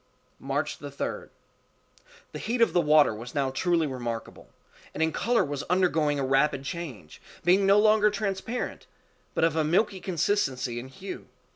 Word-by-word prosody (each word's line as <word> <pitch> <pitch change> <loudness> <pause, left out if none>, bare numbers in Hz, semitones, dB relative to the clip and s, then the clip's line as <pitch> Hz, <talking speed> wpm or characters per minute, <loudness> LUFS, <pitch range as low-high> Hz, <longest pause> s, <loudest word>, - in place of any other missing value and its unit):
March - - -2
3d. - - -5 1.0
The - - -7
heat 235 +3 -2
of 230 - +4
the 175 - +4
water 150 -5 +5
was 115 +5 -9
now 135 -2 0
truly 170 +4 +1
remarkable, 120 -4 -6 0.5
and 160 - +1
in 160 - +1
color 240 +6 +1
was 145 -1 -4
undergoing 165 -5 +2
a 135 - 0
rapid 135 +1 +2
change, 140 - -7 0.2
being 190 +3 +4
no 200 +1 +6
longer 215 0 +5
transparent, 210 +3 -4 0.5
but - - +1
of 165 -1 +3
a 160 - +2
milky 190 +5 +1
consistency 140 - -1
and 130 +2 -9
hue. 190 +8 -8
160 Hz, 155 wpm, -27 LUFS, 135-195 Hz, 1.0 s, no